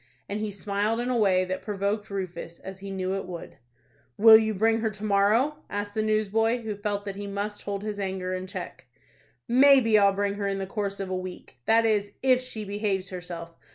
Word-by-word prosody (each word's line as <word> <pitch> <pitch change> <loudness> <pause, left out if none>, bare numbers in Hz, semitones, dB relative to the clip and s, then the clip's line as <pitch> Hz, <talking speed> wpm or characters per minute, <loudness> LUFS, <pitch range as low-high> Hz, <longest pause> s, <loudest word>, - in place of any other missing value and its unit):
and 205 +1 -3
he 215 0 -2
smiled 205 +3 -1
in 245 +1 -1
a - - +1
way 190 -5 +3
that 185 0 -3
provoked 205 +1 -2
Rufus, 185 -3 -5
as 190 0 -9
he 200 0 -8
knew 190 -1 -2
it 195 -1 -3
would. 175 -5 -8 0.6
"Will 220 +1 +9
you 220 0 +4
bring 225 +2 +2
her 220 0 0
to 210 0 -10
morrow?" 215 +9 +3
asked 205 0 -4
the 215 - 0
news 215 0 +1
boy, 225 +3 +1
who 215 -2 -3
felt 205 0 -3
that 200 -1 -5
he 205 0 -5
must 205 +1 -4
hold 200 0 -4
his 210 -1 -4
anger 190 -1 -3
in 185 0 -4
check. 190 - -8 0.6
"Maybe 255 -3 +6
I'll 200 -1 +5
bring 200 0 -1
her 200 0 -3
in 195 0 -1
the 195 - -3
course 200 0 -3
of 190 -1 -4
a - - 0
week; 185 -8 -8
that 225 0 +5
is, 205 -2 +1
if 255 -1 +4
she 225 -4 -6
behaves 200 -2 -2
herself. 175 -2 -7
205 Hz, 220 wpm, -27 LUFS, 195-215 Hz, 0.6 s, Will